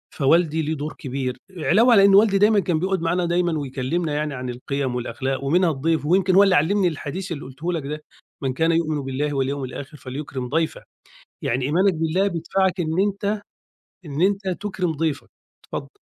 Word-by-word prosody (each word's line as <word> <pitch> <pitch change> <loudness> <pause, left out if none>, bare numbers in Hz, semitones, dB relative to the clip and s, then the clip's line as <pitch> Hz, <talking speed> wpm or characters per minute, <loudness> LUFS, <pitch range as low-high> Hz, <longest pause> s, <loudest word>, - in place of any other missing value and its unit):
فوالدي 160 +2 +3
له 155 +1 -1
دور 150 +1 -5
كبير، 130 -3 -4 0.2
علاوة 225 +9 +4
على 200 -2 +7
إن 195 -1 +6
والدي 200 -1 +5
دايمًا 210 +1 +5
كان 175 -4 0
بيقعد 190 +1 0
معانا 175 +2 0
دايمًا 170 -2 +1
ويكلّمنا 145 +4 -2
يعني 150 0 -1
عن 125 -1 -5
القيم، 130 +1 -3
والأخلاق، 130 +2 -3
ومنها 170 +4 +3
الضيف، 155 +2 0
ويمكن 185 +2 +3
هو 200 - +8
اللي 190 -2 +4
علّمني 180 +5 +3
الحديث 170 +4 -4
اللي 150 - -4
قُلته 150 +7 -4
لك 150 -5 -3
ده: 150 +1 -5 0.4
"مَنْ 130 -1 0
كانَ 165 +4 +2
يُؤْمِنُ 155 -3 0
بِاللهِ، 140 +2 -2
وَاليَوْمِ 135 +1 -1
الآخِرِ، 140 +3 -8
فَلْيُكْرِمْ 130 -2 -6
ضَيْفَهُ." 160 +2 -1 0.6
يعني 125 +2 0
إيمانك 185 +6 +3
بالله 165 +5 +1
بِيِدفَعَك 185 +2 0
إن 160 +3 0
أنت 205 +1 -1 0.6
إن 145 +2 -4
أنت 195 +1 +1
تُكرم 190 -4 -2
ضيفك. 150 -2 -2 0.4
اتفضل. - - -6
160 Hz, 180 wpm, -23 LUFS, 140-185 Hz, 0.6 s, هو